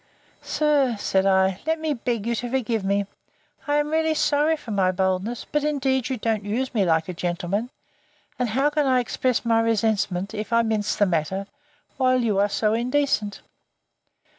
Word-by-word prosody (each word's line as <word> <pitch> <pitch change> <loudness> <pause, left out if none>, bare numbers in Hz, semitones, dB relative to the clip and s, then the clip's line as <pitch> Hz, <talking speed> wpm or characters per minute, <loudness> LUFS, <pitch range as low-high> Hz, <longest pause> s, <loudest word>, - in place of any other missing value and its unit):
Sir, 290 -5 +1
said 195 -1 +1
I, 190 -1 +2
let 320 0 +1
me 315 -1 -1
beg 235 -4 -3
you 235 - 0
to 240 +1 -3
forgive 235 -4 -1
me: 200 +1 +1 0.6
I 290 - +1
am 295 0 +1
really 320 0 +1
sorry 305 +1 +2
for 240 - -9
my 190 -3 +2
boldness; 190 +5 -1
but 295 -1 +1
indeed 270 -4 0
you 260 - -2
don't 220 -2 -1
use 245 +6 -2
me 205 -5 +2
like 160 -2 +1
a 180 - -4
gentleman: 175 +6 -2 0.7
and 250 -2 0
how 270 +7 +1
can 295 -2 +1
I 255 -1 +4
express 250 0 -1
my 225 -1 +3
resentment, 210 -4 0
if 210 +2 -5
I 230 0 +4
mince 215 -2 0
the 205 - +3
matter, 185 +2 -1 0.5
while 255 -1 +3
you 215 -5 +1
are 205 +1 +3
so 215 +1 +1
indecent? 240 -3 0
230 Hz, 180 wpm, -24 LUFS, 200-265 Hz, 0.7 s, I